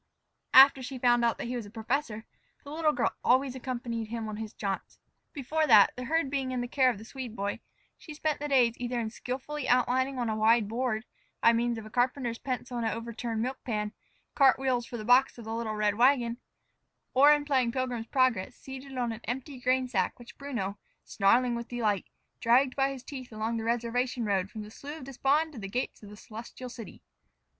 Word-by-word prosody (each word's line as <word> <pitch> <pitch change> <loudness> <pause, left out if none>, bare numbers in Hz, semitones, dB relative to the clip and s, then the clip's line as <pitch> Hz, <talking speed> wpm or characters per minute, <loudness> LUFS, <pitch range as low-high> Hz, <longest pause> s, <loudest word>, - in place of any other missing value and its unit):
After 270 0 +9
she 260 +1 -6
found 240 -1 +3
out 235 -1 +2
that - - -5
he 245 +1 -3
was 235 -4 -5
a - - -11
professor, 225 0 -3 0.4
the 285 - -10
little 310 0 +2
girl 280 -5 0
always 260 +1 +3
accompanied 240 -3 -4
him 225 0 -4
on 215 -1 -5
his 220 -1 -6
jaunts. 195 -3 -4 0.3
Before 305 +3 -1
that, 210 -6 +7
the 250 - -5
herd 320 0 0
being 270 -2 -1
in 255 -1 -2
the 245 - -3
care 260 0 +3
of 245 - -2
the 215 - -11
Swede 250 -2 -7
boy, 200 0 -3 0.4
she 305 - -10
spent 305 0 -1
the 295 - -3
days 250 -5 +4
either 245 0 -2
in 220 -2 -3
skilfully 260 +4 -5
outlining 255 +2 +2
on 240 -2 -1
a 220 - -1
wide 220 0 +4
board, 230 0 -2 0.3
by 230 - +5
means 235 0 0
of 220 - -7
a 215 - -11
carpenter's 245 -1 0
pencil 250 -1 -4
and 235 - -1
an - - 0
overturned 230 -1 -3
milk 260 +2 -4
pan, 210 -3 -2 0.4
cart 275 -2 +5
wheels 255 -3 0
for 240 - -6
the 215 - -7
box 250 +3 +4
of 235 - -10
the 220 - -4
little 225 -1 -3
red 210 -1 +2
wagon, 240 0 +3 0.8
or 280 +3 +7
in 295 -1 +3
playing 260 -5 +2
"Pilgrim's 245 -3 -3
Progress," 255 -4 +1
seated 265 0 -9
on 240 -2 0
an 225 0 -7
empty 260 +2 -5
grain 255 +1 +1
sack 250 - -1
which 240 -1 -13
Bruno, 225 -9 -4 0.2
snarling 240 +5 +3
with 235 0 -4
delight, 215 -5 -1 0.3
dragged 255 +3 +3
by 270 0 +2
his 265 -2 -8
teeth 260 -4 -8
along 220 +1 -2
the 225 - -3
reservation 235 +1 -1
road 195 -2 0
from 215 -1 -7
the 210 - -11
Slough 290 +6 -8
of 305 - -10
Despond 275 +4 +1
to 245 - -8
the 195 - -5
gates 245 +5 -3
of 205 - -11
the 210 - -11
Celestial 235 +3 -9
City. 235 -3 -10
245 Hz, 215 wpm, -29 LUFS, 225-265 Hz, 0.8 s, After